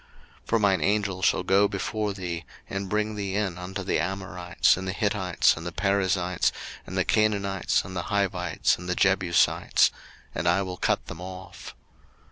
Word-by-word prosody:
02:023:023 -, -, -29 dB
For 115 Hz, -, +3 dB
mine 100 Hz, -5 st, +2 dB
Angel 100 Hz, +1 st, 0 dB
shall -, -, +2 dB
go 100 Hz, +2 st, +4 dB
before 105 Hz, +1 st, -2 dB
thee, 90 Hz, -3 st, -5 dB, 0.2 s
and 95 Hz, 0 st, -4 dB
bring 105 Hz, +1 st, 0 dB
thee 100 Hz, -2 st, -3 dB
in 100 Hz, -4 st, -1 dB
unto 95 Hz, +2 st, -5 dB
the -, -, 0 dB
Amorites, 95 Hz, 0 st, +1 dB
and 95 Hz, 0 st, -6 dB
the 95 Hz, -, -2 dB
Hittites, 100 Hz, -4 st, +2 dB
and 80 Hz, -, -8 dB
the 85 Hz, -, -4 dB
Perizzites, 95 Hz, -2 st, +1 dB, 0.4 s
and -, -, -5 dB
the -, -, +2 dB
Canaanites, 100 Hz, -3 st, +1 dB
the 90 Hz, -1 st, -4 dB
Hivites, 95 Hz, -4 st, 0 dB
and 90 Hz, 0 st, -7 dB
the 90 Hz, -, 0 dB
Jebusites: 95 Hz, -3 st, +3 dB, 0.4 s
and 80 Hz, -, -2 dB
I 90 Hz, +3 st, +3 dB
will 90 Hz, -1 st, -5 dB
cut -, -, 0 dB
them 85 Hz, -, -8 dB
off. 90 Hz, -1 st, -9 dB
95 Hz, 170 wpm, -26 LUFS, 90-100 Hz, 0.4 s, go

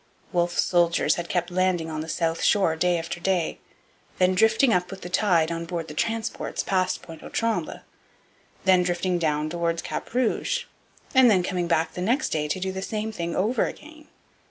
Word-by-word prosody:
Wolfe's 175 Hz, 0 st, +2 dB
soldiers 175 Hz, -1 st, +2 dB
had 175 Hz, -1 st, -5 dB
kept 175 Hz, 0 st, -1 dB
landing 180 Hz, -2 st, +1 dB
on 155 Hz, 0 st, -3 dB
the 160 Hz, -, -7 dB
south 165 Hz, 0 st, -1 dB
shore 190 Hz, -6 st, +3 dB
day 175 Hz, +2 st, +2 dB
after 165 Hz, +1 st, -5 dB
day; 180 Hz, -2 st, 0 dB, 0.6 s
then 185 Hz, 0 st, +3 dB
drifting 225 Hz, +5 st, +4 dB
up 180 Hz, 0 st, +1 dB
with 195 Hz, -, -8 dB
the 175 Hz, -, -7 dB
tide 175 Hz, -4 st, +2 dB
on 165 Hz, 0 st, -3 dB
board 165 Hz, -1 st, -4 dB
the -, -, -7 dB
transports 225 Hz, +7 st, -2 dB
past 185 Hz, -1 st, 0 dB
Pointe 165 Hz, -2 st, -11 dB
aux -, -, -9 dB
Trembles; 230 Hz, -1 st, -2 dB, 0.8 s
then 185 Hz, -1 st, +5 dB
drifting 175 Hz, 0 st, 0 dB
down 150 Hz, -2 st, 0 dB
towards 170 Hz, 0 st, -2 dB
Cap -, -, -5 dB
Rouge; 255 Hz, -, 0 dB, 0.5 s
and 260 Hz, -2 st, +7 dB
then 190 Hz, -4 st, +4 dB
coming 180 Hz, -1 st, -1 dB
back 165 Hz, 0 st, +1 dB
the 180 Hz, -, -5 dB
next 245 Hz, +11 st, +1 dB
day 150 Hz, -1 st, -1 dB
to 185 Hz, -, -2 dB
do 190 Hz, +1 st, -2 dB
the 190 Hz, 0 st, -5 dB
same 215 Hz, +2 st, -3 dB
thing 170 Hz, -5 st, -4 dB
over 220 Hz, +6 st, +1 dB
again. 310 Hz, 0 st, -11 dB
180 Hz, 190 wpm, -25 LUFS, 170-205 Hz, 0.8 s, and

